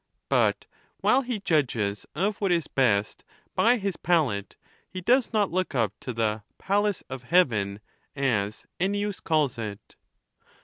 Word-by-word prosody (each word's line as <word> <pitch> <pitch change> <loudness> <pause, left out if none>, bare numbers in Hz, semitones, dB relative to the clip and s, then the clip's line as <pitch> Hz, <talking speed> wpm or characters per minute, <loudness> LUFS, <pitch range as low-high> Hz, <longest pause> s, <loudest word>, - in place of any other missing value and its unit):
But - - +2 0.4
while 265 - +4
he 245 -5 -4
judges 125 - 0
of 200 +2 0
what 195 -3 +1
is 170 -3 +2
best 110 -6 +1 0.3
by 245 +2 +4
his 200 -4 -3
palate, 145 - 0 0.3
he 185 - -6
does 245 +7 +2
not 210 -5 +1
look 185 -4 -1
up 110 -5 +1
to 125 - -5
the 110 -2 -1
" - - -48
palace 205 -1 +1
of 130 -1 -6
heaven," 110 - +2 0.3
as 110 -7 -1
Ennins 205 +2 -1
calls 150 -6 +1
it. 105 -2 -7
155 Hz, 145 wpm, -26 LUFS, -, 0.4 s, while